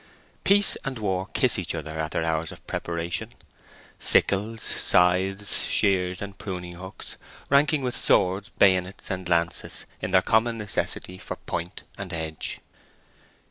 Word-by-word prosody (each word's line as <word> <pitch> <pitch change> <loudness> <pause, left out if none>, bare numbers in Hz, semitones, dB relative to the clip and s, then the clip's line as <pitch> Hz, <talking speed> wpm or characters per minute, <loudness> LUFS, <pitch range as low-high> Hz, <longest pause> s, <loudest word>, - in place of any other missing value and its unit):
Peace 205 0 +5
and 135 -3 -4
war 95 -3 -1
kiss - - +2
each - - -3
other 75 - -5
at 80 0 -1
their 80 - -1
hours 80 0 -1
of - - -13
preparation—sickles, 95 +5 -2
scythes, 95 +3 +2
shears, 90 -2 +2
and 100 -1 -9
pruning 90 -3 -5
hooks, 95 +2 -4 0.3
ranking 145 0 +4
with 125 -1 -1
swords, 95 +2 +2
bayonets, 95 0 +2
and 95 -1 -4
lances, 85 0 0 0.2
in - - -2
their 95 - +4
common 115 +1 +2
necessity 95 -3 0
for - - -6
point 85 +2 -5 0.2
and 95 -2 -5
edge. 80 -1 -3
95 Hz, 135 wpm, -25 LUFS, 85-105 Hz, 0.3 s, Peace